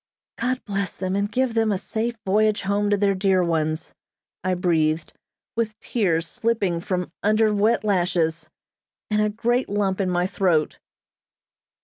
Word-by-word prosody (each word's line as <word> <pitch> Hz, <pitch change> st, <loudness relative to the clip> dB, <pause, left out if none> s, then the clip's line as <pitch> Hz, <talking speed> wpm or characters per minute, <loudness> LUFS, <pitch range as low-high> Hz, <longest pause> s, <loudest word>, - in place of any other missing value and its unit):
"God 255 Hz, +2 st, -1 dB
bless 200 Hz, -3 st, -2 dB
them, 185 Hz, 0 st, -2 dB
and 200 Hz, +1 st, -1 dB
give 255 Hz, +1 st, +1 dB
them 225 Hz, -1 st, +2 dB
a 195 Hz, -, +1 dB
safe 225 Hz, +4 st, -3 dB
voyage 210 Hz, +2 st, +2 dB
home 200 Hz, +1 st, +1 dB
to 205 Hz, -, +3 dB
their 200 Hz, 0 st, +2 dB
dear 190 Hz, -1 st, +2 dB
ones," 160 Hz, -1 st, -1 dB, 0.5 s
I 185 Hz, 0 st, +1 dB
breathed, 160 Hz, -3 st, +1 dB, 0.4 s
with 220 Hz, -2 st, -2 dB
tears 170 Hz, -8 st, 0 dB
slipping 200 Hz, -5 st, 0 dB
from 180 Hz, 0 st, -3 dB
under 215 Hz, +1 st, +3 dB
wet 210 Hz, +3 st, +2 dB
lashes, 175 Hz, -5 st, 0 dB, 0.6 s
and 210 Hz, 0 st, +2 dB
a 210 Hz, -, +2 dB
great 240 Hz, +4 st, 0 dB
lump 200 Hz, -1 st, 0 dB
in 185 Hz, -, 0 dB
my 175 Hz, 0 st, +1 dB
throat. 180 Hz, -5 st, +1 dB
200 Hz, 150 wpm, -23 LUFS, 175-215 Hz, 0.6 s, to